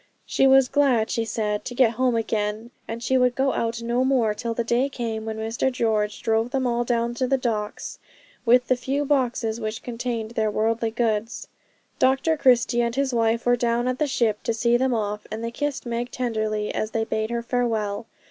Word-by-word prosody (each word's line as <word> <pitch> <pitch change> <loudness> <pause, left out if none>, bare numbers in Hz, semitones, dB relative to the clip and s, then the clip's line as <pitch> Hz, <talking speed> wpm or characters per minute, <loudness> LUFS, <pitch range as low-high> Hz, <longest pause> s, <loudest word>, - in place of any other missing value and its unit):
She 270 - +3
was 265 -1 +6
glad, 260 -5 +2
she 230 -1 0
said, 210 -2 -2
to 245 - -5
get 245 -3 +4
home 250 +1 +1
again, 220 0 -2 0.2
and 230 +1 -5
she 260 +1 +2
would 250 -1 +2
go 270 0 +1
out 230 0 -2
no 240 +2 +1
more 255 -5 +2
till 230 +2 -4
the 235 - 0
day 240 +4 +1
came 225 -4 -4
when 220 0 -4
Mr 225 +4 -1
George 215 -4 -1
drove 225 +1 +1
them 260 0 -1
all 240 -1 +1
down 235 0 0
to 255 +1 -1
the 270 +1 +2
docks, 220 -5 -3 0.4
with 250 +1 +4
the 255 - +3
few 270 +4 -2
boxes 245 -5 0
which 215 0 -4
contained 235 -2 -4
their 220 -2 0
worldly 225 +2 0
goods. 225 -1 -2 0.5
Dr 270 +5 +3
Christie 245 -4 +3
and 235 0 -1
his 275 -1 0
wife 230 0 +1
were 245 0 +4
down 240 0 0
at 255 0 -1
the 300 - +2
ship 225 -6 0
to 230 - -1
see 235 +1 +2
them 255 0 +2
off, 210 -1 -3
and 220 +1 -4
they 230 - -3
kissed 290 +2 -3
Meg 240 +1 -3
tenderly 215 -4 -2
as 215 - -2
they 225 0 -1
bade 220 0 -2
her 235 0 -2
farewell. 225 -4 -1
235 Hz, 205 wpm, -24 LUFS, 220-250 Hz, 0.5 s, was